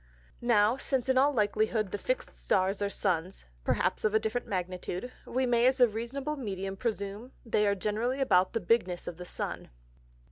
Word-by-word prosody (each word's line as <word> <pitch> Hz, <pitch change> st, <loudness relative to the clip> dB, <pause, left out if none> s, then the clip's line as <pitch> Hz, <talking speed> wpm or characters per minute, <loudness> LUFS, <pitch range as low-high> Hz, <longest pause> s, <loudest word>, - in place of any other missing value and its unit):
Now, 230 Hz, 0 st, +4 dB
since 265 Hz, -2 st, 0 dB
in 260 Hz, -, +3 dB
all 280 Hz, +2 st, +5 dB
likelyhood 215 Hz, -3 st, +1 dB
the 205 Hz, -, -3 dB
fix'd -, -, -2 dB
Stars 195 Hz, +1 st, +1 dB
are 200 Hz, -, +1 dB
Suns, 185 Hz, -2 st, -1 dB, 0.2 s
(perhaps -, -, 0 dB
of 215 Hz, 0 st, +2 dB
a -, -, +6 dB
different 220 Hz, +3 st, -2 dB
Magnitude) 185 Hz, +4 st, -3 dB, 0.2 s
we 260 Hz, +1 st, 0 dB
may 240 Hz, 0 st, +4 dB
as 260 Hz, 0 st, +2 dB
a 245 Hz, -, +7 dB
reasonable 265 Hz, +7 st, -4 dB
Medium 195 Hz, -6 st, -4 dB
presume 210 Hz, +3 st, -4 dB
they 210 Hz, -2 st, +2 dB
are 200 Hz, -, +2 dB
generally 220 Hz, +7 st, -1 dB
about 185 Hz, -8 st, +3 dB
the 230 Hz, -, -1 dB
bigness 180 Hz, -3 st, +1 dB
of 165 Hz, -, -6 dB
the 180 Hz, -, -8 dB
Sun. -, -, -4 dB
215 Hz, 180 wpm, -30 LUFS, 195-245 Hz, 0.2 s, a